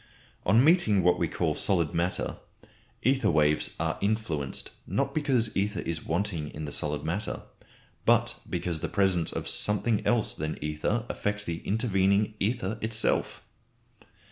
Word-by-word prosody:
On 110 +7 +6
meeting 140 - +4
what 90 0 +4
we - - +1
call - - 0
solid 85 -6 +1
matter, 85 +2 -1 0.7
ether 135 +2 +3
waves 75 -2 +2
are - - -1
influenced, 100 -10 -1 0.2
not - - -1
because 130 -7 +1
ether 100 -1 0
is 85 -1 -3
wanting 85 -3 -1
in 75 0 -5
the 75 - -5
solid 75 0 -3
matter, 100 +6 -3 0.6
but - - +2
because 85 -3 -2
the - - -3
presence 95 -5 +2
of - - -4
something 105 +1 +2
else 120 -3 +1
than 75 +1 -4
ether 75 +10 -1
affects 105 0 -1
the 85 -4 -3
intervening 100 -1 +2
ether 110 0 -1
itself. 110 0 0
100 Hz, 140 wpm, -28 LUFS, 85-110 Hz, 0.7 s, On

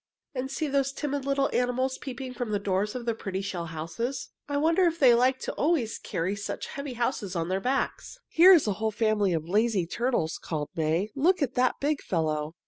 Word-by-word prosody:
"And 265 0 -3
see 290 +3 -2
those 275 -1 +1
timid 285 -1 -3
little 275 0 +2
animals 255 +2 0
peeping 260 -1 -6
from 245 -2 -4
the 210 - +1
doors 200 +2 -1
of 245 -2 -5
their 230 - +1
pretty 195 -3 -4
shell 180 -4 -4
houses. 170 - -4 0.2
I 285 - 0
wonder 330 +5 +3
if 335 -1 +1
they 260 -6 +6
like 255 +2 +3 0.2
always 290 -8 +1
to - - -27
carry 170 +3 -1
about 200 - -4
such - - -4
heavy 280 -2 -5
houses 235 -5 -2
on 165 0 -1
their 190 +1 0
backs." 270 - -2
"Here 355 +4 +7
is 345 -6 +6
a 210 - +1
whole 220 +3 -1
family 215 -2 +1
of 160 -1 -1
lazy 210 -1 +2
turtles," 235 -4 -1
called 150 -3 -4
May. 165 +6 0
"Look 335 +4 +3
at 265 - -2
that 255 0 +1
big 290 +1 0
fellow! 155 -2 -1
235 Hz, 215 wpm, -27 LUFS, 190-275 Hz, 0.2 s, Here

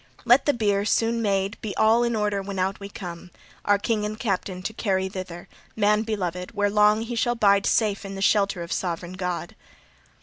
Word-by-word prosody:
Let 245 +5 +5
the 290 - +4
bier, 205 -3 +1
soon 230 +2 +1
made, 195 -1 -1
be 210 -3 -5
all 225 +2 +4
in 235 -1 0
order 210 -2 0
when 195 0 -6
out 190 +1 -1
we 200 0 -8
come, 175 -3 -8 0.4
our 205 0 +4
king 210 +1 -1
and 215 +1 -4
captain 190 -4 -2
to 220 - -3
carry 190 -4 0
thither 185 -2 -7 0.3
man 210 0 +3
beloved 180 -5 -3
where 205 0 +1
long 210 +1 +4
he 235 +1 -5
shall 240 +1 +1
bide 200 -3 +3
safe 210 -3 +1
in 195 0 -7
the 195 - -6
shelter 200 -3 +2
of 170 - -9
sovran 175 0 -3
God." 180 -2 -4
200 Hz, 200 wpm, -24 LUFS, 190-220 Hz, 0.4 s, Let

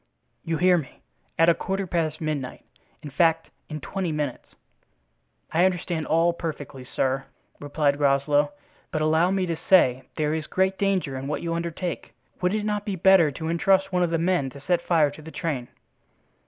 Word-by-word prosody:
"You 165 -1 -1
hear 180 0 +4
me—at 135 - -3
a 170 - +7
quarter 195 +3 -3
past 165 -3 -2
midnight—in 145 0 -6
fact, 165 +3 +2 0.2
in 155 -1 -5
twenty 185 +3 -3
minutes." 150 -4 -4 1.0
"I 170 +2 +3
understand 175 -3 0
all 165 +2 +3
perfectly, 145 -5 -6
sir," 135 +1 -1 0.3
replied 145 0 0
Groslow; 145 +1 +2 0.4
"but 155 - -1
allow 160 +3 +3
me 190 -1 +1
to 170 -2 -2
say 130 -7 +4
there 150 0 0
is 160 -1 -3
great 190 +1 0
danger 190 -8 0
in 130 +1 -5
what 150 - -3
you 165 -1 -2
undertake; 170 +1 -4 0.3
would 180 +3 +1
it 210 -1 -2
not 210 -1 -1
be 205 -2 -3
better 185 -3 +5
to 160 +3 -5
intrust 190 +3 +2
one 180 - +2
of 175 - +2
the 165 - +1
men 170 -5 +1
to 140 +1 -12
set 175 +3 +1
fire 160 -5 +2
to 150 - -12
the 155 - -10
train?" 150 -7 -3
165 Hz, 175 wpm, -25 LUFS, 145-180 Hz, 1.0 s, a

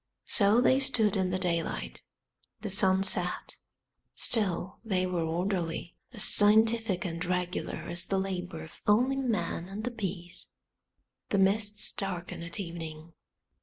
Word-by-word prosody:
So 210 +3 +3
they 260 +1 +4
stood 235 -7 +2
in 190 -2 +1
the 185 - -1
daylight. 170 -3 -2 0.6
The 210 - -3
sun 190 0 +4
set, 180 -2 +1 0.6
still 190 -5 +2
they 190 -5 0
were 180 -2 -1
orderly, 170 0 -2 0.2
as 215 -4 -2
scientific 215 -2 +4
and 165 -1 -3
regular 180 0 -2
as 170 0 -1
the 195 - 0
labour 180 -4 -4
of 160 - -13
only 245 +6 +3
man 195 -9 -2
and 205 +2 -6
the 245 - -2
bees. 185 -6 -5 0.8
The 200 - +1
mists 205 +2 +1
darken 180 -4 -5
at 170 +4 -7
evening. 165 -3 -7
190 Hz, 135 wpm, -29 LUFS, 175-210 Hz, 0.8 s, they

